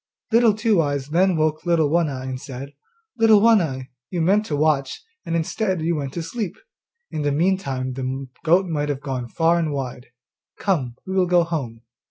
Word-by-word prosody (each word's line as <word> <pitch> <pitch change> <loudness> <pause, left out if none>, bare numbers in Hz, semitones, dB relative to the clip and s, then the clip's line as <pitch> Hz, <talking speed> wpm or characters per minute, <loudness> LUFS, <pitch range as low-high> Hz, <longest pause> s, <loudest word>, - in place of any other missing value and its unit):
Little 230 -2 +5
Two 215 -4 +2
eyes 145 -2 -2
then 180 +3 +3
woke 155 0 0
Little 165 -4 +2
One 170 -1 +2
eye 130 -2 -5
and 130 0 -5
said, 135 +1 -8 0.5
'Little 220 -2 +6
One 225 -1 +5
eye, 130 -5 -4 0.2
you 180 - -3
meant 200 +6 +2
to 150 - -1
watch, 145 - +1 0.3
and, 165 - -1
instead, 185 +3 -1
you 170 +1 +1
went 140 -3 -3
to 170 - -3
sleep; 215 +1 -4 0.6
in 155 - -3
the 145 0 +1
meantime 140 -6 0
the 130 +1 -4 0.2
goat 175 +4 +4
might 150 -4 -2
have 140 -1 -3
run 130 -3 -3
far 165 +3 +2
and 160 -3 -1
wide. 130 -3 -5 0.5
Come, 140 - -1
we 190 - -4
will 185 -1 +2
go 175 -1 +4
home. 135 -9 -4
160 Hz, 195 wpm, -22 LUFS, 135-180 Hz, 0.6 s, Little